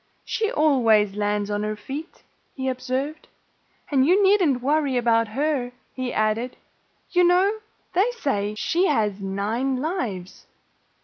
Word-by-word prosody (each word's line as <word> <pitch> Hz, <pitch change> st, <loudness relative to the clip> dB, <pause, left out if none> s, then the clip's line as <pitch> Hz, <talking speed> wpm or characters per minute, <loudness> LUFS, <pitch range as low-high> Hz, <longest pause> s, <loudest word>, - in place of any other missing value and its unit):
"She 445 Hz, 0 st, -1 dB
always 230 Hz, -, +3 dB
lands 205 Hz, 0 st, -1 dB
on 205 Hz, 0 st, -1 dB
her 215 Hz, 0 st, -2 dB
feet," 275 Hz, +9 st, -8 dB, 0.3 s
he 265 Hz, -1 st, -3 dB
observed. 260 Hz, +4 st, -3 dB, 0.6 s
"And 270 Hz, -2 st, +4 dB
you 365 Hz, +8 st, +4 dB
needn't 360 Hz, -11 st, +3 dB
worry 285 Hz, -2 st, +1 dB
about 230 Hz, -1 st, +2 dB
her," 260 Hz, +1 st, -1 dB, 0.2 s
he 255 Hz, -1 st, -3 dB
added. 215 Hz, +3 st, -1 dB, 0.5 s
"You 360 Hz, 0 st, +4 dB
know, 370 Hz, +5 st, +3 dB, 0.3 s
they 390 Hz, +6 st, +3 dB
say 210 Hz, -, -1 dB
she 355 Hz, -, +1 dB
has 210 Hz, -8 st, 0 dB
nine 210 Hz, +7 st, -1 dB
lives." 240 Hz, -, -4 dB
255 Hz, 130 wpm, -24 LUFS, 215-310 Hz, 0.6 s, And